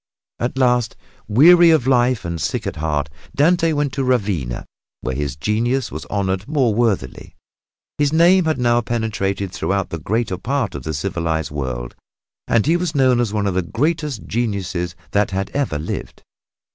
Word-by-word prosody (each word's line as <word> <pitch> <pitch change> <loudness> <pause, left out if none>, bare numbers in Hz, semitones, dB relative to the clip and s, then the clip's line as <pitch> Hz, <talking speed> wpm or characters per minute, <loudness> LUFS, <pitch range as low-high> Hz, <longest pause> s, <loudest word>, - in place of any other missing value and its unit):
At 120 +2 -2
last, 125 -3 +2 0.3
weary 170 +9 +7
of 160 -7 +4
life 125 -5 +2
and 85 -1 -3
sick 120 -4 -2
at 95 -4 -4
heart, 75 -2 -1 0.3
Dante 165 +3 +3
went 145 -3 -1
to 135 - -1
Ravenna, 100 - -1 0.4
where 65 - -3
his 70 0 -3
genius 115 - -1
was 75 -1 -6
honored 95 0 -2
more 135 -7 +2
worthily. 105 - -1 0.6
His 145 -1 +2
name 170 +3 +5
had 155 -2 +1
now 120 -1 +2
penetrated 105 -5 -2
throughout 95 +1 -2
the 85 - -4
greater 105 +2 -1
part 130 -2 -1
of 70 - -5
the 80 +4 -4
civilized 80 -2 -2
world 65 -4 -4 0.5
and 115 -3 +2
he 165 +4 +3
was 175 -3 -3
known 130 -3 +4
as 120 -4 0
one 105 -1 -1
of 100 - 0
the 95 - +1
greatest 145 - -2
geniuses 95 -7 -2 0.2
that 100 0 +2
had 95 0 -3
ever 140 - -1
lived. 75 - -6
110 Hz, 170 wpm, -20 LUFS, 90-130 Hz, 0.6 s, weary